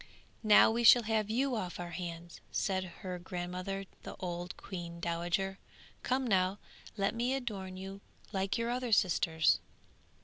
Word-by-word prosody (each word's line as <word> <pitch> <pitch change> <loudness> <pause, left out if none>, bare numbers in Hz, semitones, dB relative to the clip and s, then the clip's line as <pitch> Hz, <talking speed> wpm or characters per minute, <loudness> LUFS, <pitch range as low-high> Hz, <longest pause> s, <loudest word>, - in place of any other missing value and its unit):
'Now 215 0 +7
we 235 +1 0
shall 235 +1 +9
have 215 -1 0
you 255 +3 +1
off 185 -6 -4
our 175 -1 -5
hands,' 170 -1 -6
said 190 -2 0 0.2
her 180 -3 -4
grandmother, 180 +2 -4 0.2
the - - -8
old 175 -1 -4
queen 170 -3 -7
dowager. 175 +3 -1 0.4
'Come 260 +1 0
now, 190 -3 +2 0.4
let 195 -1 +1
me 245 +3 0
adorn 195 -8 -4
you 195 +1 -7 0.3
like 195 0 0
your 230 +1 -1
other 250 -1 -2
sisters!' 165 -4 +3
195 Hz, 145 wpm, -33 LUFS, 175-220 Hz, 0.4 s, shall